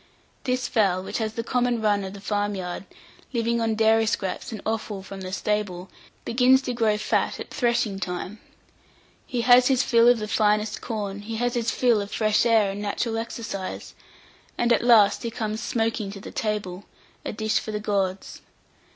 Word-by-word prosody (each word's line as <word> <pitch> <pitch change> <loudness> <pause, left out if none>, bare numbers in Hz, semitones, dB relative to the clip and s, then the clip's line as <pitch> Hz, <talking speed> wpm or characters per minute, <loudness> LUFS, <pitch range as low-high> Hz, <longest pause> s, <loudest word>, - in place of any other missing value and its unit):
This 255 -1 0
fowl, 195 -6 +1
which - - -4
has 220 -1 -2
the 230 - -2
common 245 0 0
run 205 -2 +1
of 190 0 -6
the 200 - -9
farm 205 0 -1
yard, 180 0 -5 0.5
living 235 0 0
on 225 -1 +1
dairy 220 0 +3
scraps 195 -1 -2
and 220 - -5
offal 215 -3 -3
from 195 0 -9
the 185 0 -6
stable, 195 -2 -2 0.3
begins 255 +2 +4
to 250 - -2
grow 220 -3 +1
fat 210 - 0
at - - -8
threshing 235 -5 0
time. 180 +3 -5 0.9
He 245 - -1
has 245 +1 +6
his 265 -1 +3
fill 235 -1 +4
of 245 0 +6
the 215 -1 -4
finest 210 0 +1
corn; 205 -3 -4
he 225 +2 -6
has 245 +2 0
his 235 -2 0
fill 235 -4 +2
of 200 - -6
fresh 215 +1 +2
air 220 -4 +4
and 200 +1 -6
natural 225 +2 -2
exercise, 225 -4 -6 0.6
and 240 0 +3
at - - +2
last 230 -4 +5
he 235 - -3
comes 220 -1 -3
smoking 225 -3 -1
to 200 - -8
the - - -9
table, 205 -3 -3 0.4
a - - -3
dish 220 +1 0
for - - -8
the 210 - -2
gods. 195 -2 -2
220 Hz, 185 wpm, -25 LUFS, 200-235 Hz, 0.9 s, has